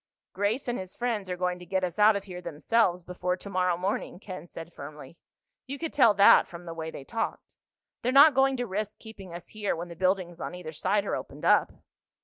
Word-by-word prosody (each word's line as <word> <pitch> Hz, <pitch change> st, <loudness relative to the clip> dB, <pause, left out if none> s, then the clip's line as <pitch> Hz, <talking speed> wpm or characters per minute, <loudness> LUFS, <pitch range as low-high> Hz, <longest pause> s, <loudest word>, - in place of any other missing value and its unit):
"Grace 210 Hz, +7 st, -1 dB
and 240 Hz, -, -1 dB
his 185 Hz, -1 st, -8 dB
friends 225 Hz, -6 st, -2 dB
are 180 Hz, -, -3 dB
going 180 Hz, 0 st, -1 dB
to -, -, -10 dB
get 190 Hz, +2 st, 0 dB
us 180 Hz, +2 st, -3 dB
out 210 Hz, +1 st, +6 dB
of 200 Hz, -, -2 dB
here 180 Hz, -2 st, -8 dB
themselves 175 Hz, +3 st, +1 dB
before 180 Hz, +1 st, -2 dB
tomorrow 180 Hz, -3 st, 0 dB
morning," 185 Hz, 0 st, -3 dB
Ken 185 Hz, -4 st, -8 dB
said 165 Hz, 0 st, -10 dB
firmly. 150 Hz, +2 st, -10 dB, 0.5 s
"You 280 Hz, +2 st, -5 dB
could 325 Hz, +2 st, -4 dB
tell 230 Hz, -7 st, +5 dB
that 200 Hz, +1 st, +7 dB
from 170 Hz, 0 st, -10 dB
the 170 Hz, -1 st, -7 dB
way 160 Hz, -1 st, -5 dB
they 140 Hz, -, -8 dB
talked. 225 Hz, +10 st, -4 dB, 0.5 s
They're 250 Hz, -, 0 dB
not 285 Hz, +3 st, +8 dB
going 270 Hz, 0 st, +3 dB
to 245 Hz, -, -1 dB
risk 210 Hz, 0 st, -4 dB
keeping 200 Hz, -5 st, -11 dB
us 170 Hz, 0 st, -9 dB
here 210 Hz, -4 st, -2 dB
when 170 Hz, +1 st, -6 dB
the 170 Hz, -, -9 dB
buildings 185 Hz, -1 st, 0 dB
on -, -, -5 dB
either 165 Hz, -3 st, -8 dB
side 195 Hz, +6 st, 0 dB
are -, -, -1 dB
opened -, -, -7 dB
up." -, -, +4 dB
185 Hz, 220 wpm, -28 LUFS, 175-215 Hz, 0.5 s, not